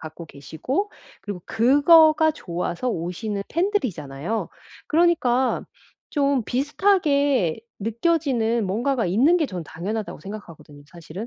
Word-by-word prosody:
갖고 160 +2 -9
계시고 160 - -4 0.3
그리고 200 -4 -7
그거가 310 +6 +5
좋아서 180 - -4
오시는 200 +2 -3
팬들이잖아요. 220 - -2 0.4
그러니까 305 -7 +2 0.5
좀 280 -3 +1
비슷하게 280 - +1 0.2
느껴지는 235 - 0
뭔가가 235 +4 0
있는 255 - +4
게 315 - +1
전 180 -8 -6
'당연하다.'고 200 +7 -5
생각하거든요 165 -8 -11
사실은? 170 +5 -9
230 Hz, 305 characters per minute, -23 LUFS, 175-290 Hz, 0.5 s, 그거가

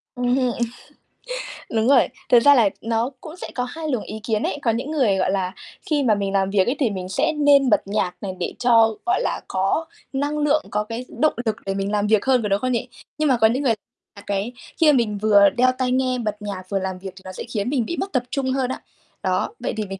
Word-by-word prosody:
Ừm 245 0 +1
hưm 255 -2 +1 1.2
Đúng 225 +1 +2
rồi. 270 -2 +5 0.2
Thực 240 - +7
ra 285 +4 +6
là 225 -5 +5
nó 230 +2 0
cũng 315 +1 -9
sẽ - - -6
có 250 - 0
2 310 +4 -5
luồng 250 -6 -1
ý 215 - -7
kiến 220 -2 0
ấy. 290 - -2
Có 230 - +2
những 250 +7 -3
người, 245 -11 +2
gọi 185 0 +1
là, 190 -1 -1 0.3
khi 295 -3 +1
mà 225 -5 +3
mình 200 -1 -2
làm 195 -1 +2
việc 195 -1 +3
ấy, 250 - +1
thì 250 -6 +2
mình 185 -2 -5
sẽ 190 - +1
nên 285 -3 +4
bật 210 - +4
nhạc 195 -3 -1
này 195 - -3
để 175 - -2
cho, 230 -2 +4
gọi 370 +6 +2
là, - - -2
có 195 +12 0 0.3
năng 290 +2 -1
lượng, 295 +1 +2
có 210 +1 0
cái 230 +4 -6
động 310 - +3
lực 220 -1 0
để 195 - -1
mình 195 +1 -2
làm 205 0 +1
việc 215 +1 +3
hơn, 255 -3 +3
có 210 - -1
đúng 200 +1 +2
không 255 +2 -1
nhỉ? 245 +1 -1 0.3
Nhưng 305 -1 +1
mà 255 - +4
có 220 - +7
những 255 +6 0
người 240 -5 +3 0.4
là 200 - -11
cái 205 +4 -2 0.2
khi 310 -2 +6
mà 275 - +3
mình 215 -4 0
vừa 205 -1 +5
đeo 255 +1 +5
tai 255 -1 0
nghe 255 0 +1
bật 210 -2 -3
nhạc 200 -3 -5
vừa 195 -1 0
làm 190 -1 -4
việc 190 0 -7
thì 190 - -13
nó 185 - -6
sẽ - - -7
khiến 215 +2 -1
mình 260 -5 0
bị 340 - -4
mất 390 - -3
tập 250 -2 +1
trung 265 -2 -1
hơn 260 -1 0
á. - - -4 0.4
Đó, - - 0
vậy - - -2
thì 215 - -1
mình, 195 -1 -7
230 Hz, 265 wpm, -22 LUFS, 200-265 Hz, 1.2 s, Thực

